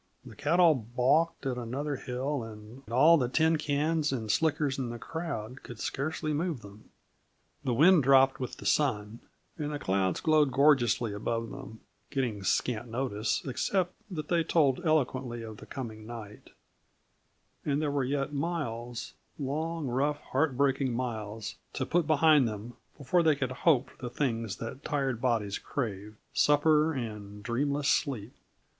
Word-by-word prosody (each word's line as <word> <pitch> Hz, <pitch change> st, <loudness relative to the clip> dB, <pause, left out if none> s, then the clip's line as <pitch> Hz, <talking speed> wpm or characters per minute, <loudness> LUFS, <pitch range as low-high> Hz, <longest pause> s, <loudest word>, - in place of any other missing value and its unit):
The 115 Hz, -4 st, -11 dB
cattle 165 Hz, -, +4 dB
balked 130 Hz, +7 st, +1 dB
at 125 Hz, -2 st, -1 dB
another 140 Hz, +5 st, -3 dB
hill, 130 Hz, +2 st, -3 dB
and 110 Hz, +2 st, -10 dB
all 150 Hz, +8 st, +6 dB
the 125 Hz, -2 st, 0 dB
tincans 155 Hz, 0 st, +1 dB
and 110 Hz, -5 st, -1 dB
slickers 150 Hz, -2 st, +1 dB
in 125 Hz, -3 st, -2 dB
the 120 Hz, -, -5 dB
crowd 130 Hz, -5 st, -5 dB
could 120 Hz, -, -10 dB
scarcely 155 Hz, +2 st, -2 dB
move 155 Hz, -4 st, -1 dB
them. 100 Hz, +1 st, -14 dB, 0.7 s
The 125 Hz, -4 st, 0 dB
wind 170 Hz, +5 st, +6 dB
dropped 135 Hz, 0 st, +5 dB
with 130 Hz, -, -5 dB
the -, -, -10 dB
sun, 115 Hz, -6 st, +1 dB, 0.4 s
and 150 Hz, 0 st, -2 dB
the 145 Hz, -, -2 dB
clouds 95 Hz, -, 0 dB
glowed 155 Hz, -3 st, +3 dB
gorgeously 125 Hz, -6 st, +3 dB
above 115 Hz, +2 st, -2 dB
them, 135 Hz, -5 st, -9 dB, 0.3 s
getting 120 Hz, -7 st, -2 dB
scant 115 Hz, +4 st, 0 dB
notice, 115 Hz, -2 st, -1 dB
except 175 Hz, +7 st, 0 dB, 0.2 s
that 155 Hz, -6 st, -5 dB
they 170 Hz, -2 st, +2 dB
told 155 Hz, -1 st, +2 dB
eloquently 130 Hz, -7 st, 0 dB
of 110 Hz, -1 st, -8 dB
the -, -, -12 dB
coming 110 Hz, -5 st, -7 dB
night; 110 Hz, -3 st, -9 dB, 1.1 s
and 145 Hz, -1 st, 0 dB
there 150 Hz, -2 st, 0 dB
were 140 Hz, -1 st, 0 dB
yet 135 Hz, +2 st, -1 dB
miles 135 Hz, -7 st, -3 dB, 0.2 s
long, 155 Hz, +3 st, -2 dB
rough, 140 Hz, +4 st, 0 dB
heartbreaking 135 Hz, -2 st, +1 dB
miles 110 Hz, -3 st, -4 dB, 0.2 s
to 130 Hz, -, -2 dB
put 165 Hz, +2 st, +1 dB
behind 155 Hz, -3 st, +5 dB
them 110 Hz, +2 st, -6 dB, 0.2 s
before 170 Hz, +5 st, +2 dB
they 160 Hz, -3 st, +4 dB
could 130 Hz, -3 st, -2 dB
hope 135 Hz, 0 st, +2 dB
for -, -, -22 dB
the 125 Hz, -, -4 dB
things 115 Hz, -5 st, -2 dB
their 115 Hz, -, -5 dB
tired 135 Hz, -4 st, -2 dB
bodies 110 Hz, -6 st, 0 dB
craved: 105 Hz, -5 st, -4 dB, 0.2 s
supper 150 Hz, +1 st, +4 dB
and 105 Hz, -6 st, -6 dB
dreamless 140 Hz, +6 st, 0 dB
sleep. 125 Hz, -7 st, 0 dB
135 Hz, 150 wpm, -29 LUFS, 115-150 Hz, 1.1 s, all